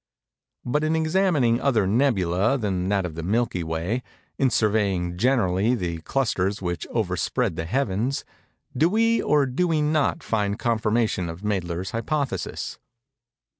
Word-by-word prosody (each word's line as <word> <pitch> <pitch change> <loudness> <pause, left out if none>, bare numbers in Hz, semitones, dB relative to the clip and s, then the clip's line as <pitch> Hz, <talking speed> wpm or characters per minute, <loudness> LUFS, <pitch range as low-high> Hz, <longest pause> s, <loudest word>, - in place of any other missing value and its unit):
But 150 +5 0
in 155 +1 +1
examining 160 -7 +2
other 115 -8 +2
"nebulæ" 105 0 +2
than 95 -4 -1
that 100 -2 +1
of 85 - -5
the 85 - -5
Milky 100 0 0
Way—in 90 +10 -3
surveying, 100 -6 +1
generally, 110 -1 +2
the 85 -6 -3
clusters 100 -3 0
which 85 -2 -3
overspread 110 0 -1
the 80 - -3
heavens—do 130 - -2
we 230 +3 +2
or 145 -2 +3
do 135 +8 0
we 160 -2 +1
not 150 +1 +1
find 105 -2 -1
confirmation 110 -6 0
of 80 +2 -8
Mädler's 95 -3 -2
hypothesis? 135 +5 -3
110 Hz, 130 wpm, -24 LUFS, 95-135 Hz, -, or